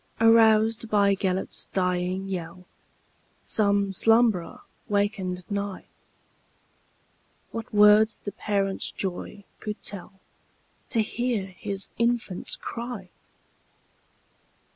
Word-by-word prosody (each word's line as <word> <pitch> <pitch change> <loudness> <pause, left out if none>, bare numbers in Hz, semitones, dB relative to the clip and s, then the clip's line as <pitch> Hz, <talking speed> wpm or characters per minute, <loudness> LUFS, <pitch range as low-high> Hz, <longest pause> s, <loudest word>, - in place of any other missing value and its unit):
Aroused 225 0 +5
by 200 -2 +4
Gêlert's 190 -1 -2
dying 180 +1 0
yell, 180 -1 -6 0.8
Some 200 -2 +1
slumberer 225 -3 +2 0.3
wakened 195 -3 -1
nigh:What 200 +3 -10
words 210 +1 +6
the 205 - -4
parent's 200 -1 -1
joy 195 +1 -5 0.2
could 210 0 -5
tellTo 200 +3 -6
hear 240 -2 -1
his 195 +1 -5
infant's 235 -5 0
cry! 230 -6 -6
200 Hz, 75 wpm, -26 LUFS, 190-220 Hz, 0.8 s, words